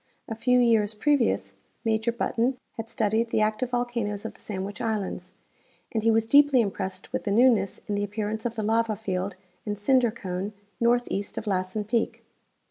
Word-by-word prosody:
A - - -3
few 250 +3 +2
years 225 -3 +3
pre 295 +7 +3
vious 250 -5 0 0.3
Major 220 +1 +1
Button 235 +2 0 0.2
had 225 0 -6
studied 220 +2 +1
the 220 - +1
active 215 +4 0
volcanoes 235 -4 -2
of - - -4
the - - -20
Sandwich 200 0 -5
islands, 195 -4 -3 0.6
and 220 - 0
he 225 - +3
was 225 0 +3
deeply 285 +2 +6
impressed 190 -3 -3
with - - -1
the - - 0
new 240 +6 +6
ness 195 -3 -2
in 205 - -2
the 205 0 0
appearance 210 +1 -3
of 235 -1 -2
the 220 - -2
lava 225 0 +2
field 190 -2 -3 0.3
and 205 -1 -3
cinder 245 +3 +3
cone 195 -2 -4 0.3
north 240 +1 +3
east 200 +1 -3
of - - -3
Lassen 190 +1 -1
peak. 225 +2 -1
220 Hz, 190 wpm, -26 LUFS, 205-235 Hz, 0.6 s, deeply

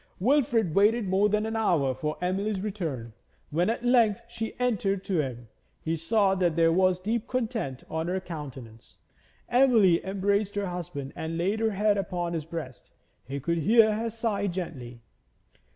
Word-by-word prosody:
Wilfrid 235 - +2
waited 210 +3 +3
more 195 +3 +3
than 210 +1 +1
an 220 0 -3
hour 165 -12 +2
for 150 +4 -3
Emily's 195 +3 -1
return. 165 - -4 0.4
When 175 +6 +1
at 235 +1 -2
length 235 -5 +3
she 230 -1 -6
entered 200 -6 0
to 180 -5 0
him, 120 -4 -6 0.3
he 165 +1 -2
saw 190 +5 +2
that 180 -4 +1
there 165 -1 +4
was 185 +1 +3
deep 220 +4 -2
content 225 - -3
on 160 +1 -3
her 185 +2 -1
countenance. 135 -10 -9 0.5
Emily 235 -9 +4
embraced 200 +1 0
her 205 0 -1
husband 175 -6 -5
and 160 +1 -4
laid 195 +6 0
her 225 0 +2
head 205 0 +1
upon 175 -2 -3
his 160 -3 -3
breast. 165 -6 -7 0.4
He 140 +2 -4
could 170 +5 -1
hear 220 +6 +5
her 225 +2 -2
sigh 220 -3 -1
gently. 135 -10 -6
190 Hz, 165 wpm, -27 LUFS, 165-215 Hz, 0.5 s, hear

